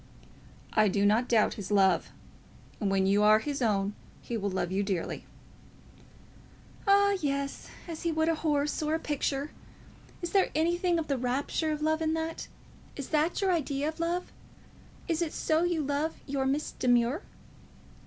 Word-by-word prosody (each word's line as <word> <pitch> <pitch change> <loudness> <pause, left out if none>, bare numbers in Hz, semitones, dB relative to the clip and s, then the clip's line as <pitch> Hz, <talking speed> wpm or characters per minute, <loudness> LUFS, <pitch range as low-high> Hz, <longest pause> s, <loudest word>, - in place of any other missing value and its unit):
"I 215 -1 +4
do 200 +1 +1
not 220 +5 +3
doubt 225 -3 +3
his 190 - -7
love. 195 -2 +3 0.7
And 205 - 0
when 195 0 +2
you 200 +2 +3
are 215 +1 +7
his 280 +4 -3
own 205 -3 +1 0.3
he 235 - -4
will 205 -2 -1
love 185 -2 -2
you 195 +1 +1
dearly." 195 -4 -3 1.6
"Ah, 400 0 +5
yes; 280 -1 -2 0.2
as 330 -2 -6
he 335 - 0
would 315 0 +1
a 330 - +3
horse 300 -2 0
or 305 +1 +1
a - - -1
picture. 290 -1 -2 0.7
Is 345 - -3
there 390 -1 +3
anything 345 +2 +2
of 325 -2 -2
the 275 -3 0
rapture 270 +5 -1
of 305 0 -3
love 315 +1 +1
in 320 0 +1
that? 325 0 -4 0.5
Is 280 - -6
that 315 +4 +1
your 385 -1 +2
idea 290 -3 0
of 320 - -9
love? 345 +2 -2 0.8
Is 335 -2 0
it 330 -3 -1
so 315 +1 +1
you 345 -3 0
love 290 +3 -1
your 270 -1 -1
Miss 290 +3 -1
Demure?" 245 +5 +2
290 Hz, 170 wpm, -29 LUFS, 230-320 Hz, 1.6 s, are